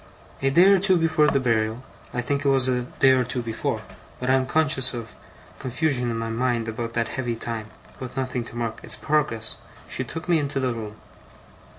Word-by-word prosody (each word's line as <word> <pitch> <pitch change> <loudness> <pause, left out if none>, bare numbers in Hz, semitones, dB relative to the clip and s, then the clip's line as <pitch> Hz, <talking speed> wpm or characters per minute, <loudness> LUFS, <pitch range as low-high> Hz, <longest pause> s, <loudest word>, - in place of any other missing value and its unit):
A 135 - +3
day 170 +6 +6
or 195 0 +6
two 190 -1 +4
before 160 -2 +3
the 140 - +3
burial 115 -1 0 0.3
I 125 - -1
think 140 +3 -1
it 140 - +3
was 135 -2 +3
a 125 -1 +1
day 130 +2 +3
or 130 -1 +4
two 125 0 -2
before, 115 -1 -2 0.4
but 125 +1 0
I - - +5
am 130 -1 +2
conscious 135 -5 +2
of 115 -2 -6 0.5
confusion 130 -1 0
in 115 - -2
my 115 0 -3
mind 115 0 0
about 115 +1 -4
that 115 -1 0
heavy 120 -3 -2
time, 115 -1 -5 0.3
with 130 0 -7
nothing 130 -2 -1
to 115 - -11
mark 115 -1 -3
its - - -3
progress 135 -7 -1 0.3
she - - -2
took 160 +1 -6
me 170 -2 +4
into 140 -1 -1
the 130 -2 0
room. 110 -2 -6
125 Hz, 210 wpm, -24 LUFS, 115-140 Hz, 0.5 s, day